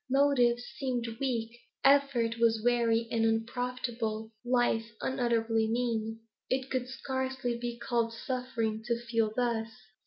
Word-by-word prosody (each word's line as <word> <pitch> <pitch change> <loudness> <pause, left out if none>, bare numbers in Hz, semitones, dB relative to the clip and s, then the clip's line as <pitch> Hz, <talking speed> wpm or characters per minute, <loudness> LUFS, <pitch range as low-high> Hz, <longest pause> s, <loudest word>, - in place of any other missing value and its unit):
Motives 255 -3 +4 0.2
seemed 250 -3 -1
weak; 235 -3 -2 0.2
effort 270 -5 +4
was 225 -2 +3
weary 235 -1 +3
and 225 -1 +2
unprofitable; 225 -1 -1
life 240 -2 +2
unutterably 230 -3 +1
mean. 225 -2 -1 0.3
It 260 +1 -1
could 255 -1 -1
scarcely 260 -2 -2
be 240 0 -4
called 235 -1 0
suffering, 230 -2 -2
to 235 -1 0
feel 230 -2 0
thus. 235 -3 0
235 Hz, 120 wpm, -31 LUFS, 225-255 Hz, 0.3 s, Motives